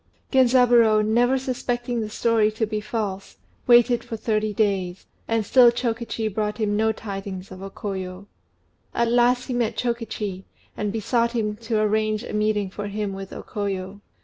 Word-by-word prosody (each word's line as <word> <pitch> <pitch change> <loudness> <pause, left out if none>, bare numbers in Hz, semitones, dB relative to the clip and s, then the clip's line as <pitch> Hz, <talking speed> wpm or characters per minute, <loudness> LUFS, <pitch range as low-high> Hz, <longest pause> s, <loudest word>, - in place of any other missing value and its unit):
Genzaburô, 240 -4 +5
never 240 +4 +3
suspecting 245 -2 -2
the 215 - -4
story 220 0 +2
to 220 +1 0
be 215 0 -3
false, 210 -3 -4 0.3
waited 240 0 +5
for 225 - -6
thirty 215 -1 0
days, 195 -4 -1 0.2
and 225 -2 0
still 250 +1 +7
Chokichi 235 -2 -2
brought 210 0 -2
him 210 -2 0
no 220 +1 +2
tidings 195 -3 -7
of 185 0 -9
O 195 - -6
Koyo. 190 -1 -6 0.7
At 235 0 +1
last 245 +1 +3
he 255 - -4
met 235 -2 -1
Chokichi, 225 -5 -3 0.3
and 210 -1 -2
besought 235 +2 0
him 210 -3 -1
to 225 -1 -1
arrange 215 0 +1
a - - -7
meeting 210 -2 0
for 205 +1 -5
him 205 -1 -3
with 195 0 -7
O - - -7
Koyo. 200 -1 -4
215 Hz, 165 wpm, -24 LUFS, 205-235 Hz, 0.7 s, still